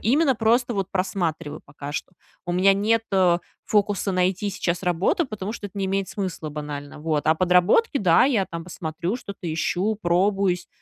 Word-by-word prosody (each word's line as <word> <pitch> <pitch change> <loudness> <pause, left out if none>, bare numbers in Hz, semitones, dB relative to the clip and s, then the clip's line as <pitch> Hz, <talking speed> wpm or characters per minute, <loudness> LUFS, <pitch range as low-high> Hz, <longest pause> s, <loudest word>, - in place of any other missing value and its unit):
именно 270 +5 +3
просто 240 +2 +2 0.2
просматриваю 170 -5 -2
пока 145 0 -9
что. 180 - -5 0.3
У 175 - -1
меня 185 +2 +5
нет, 220 +3 +2
э, 180 -3 +4 0.3
фокуса 205 -2 +1
найти 185 +2 +1
сейчас 180 -2 -2
работу, 180 - +1
потому 210 -3 -5
что 220 -3 -6
это 200 - -15
не 195 - 0
имеет 195 0 -1
смысла 185 -6 -4
банально. 145 -1 -7
Вот. 155 -1 -1
А 160 - +5
подработки, 180 - +3
да, 175 0 +5
я 225 -9 +2
там 165 0 -7
посмотрю, 170 +3 -4
что-то 200 -8 -6
ищу, 180 +6 0
пробуюсь, 185 0 +1
185 Hz, 165 wpm, -24 LUFS, 170-205 Hz, 0.3 s, меня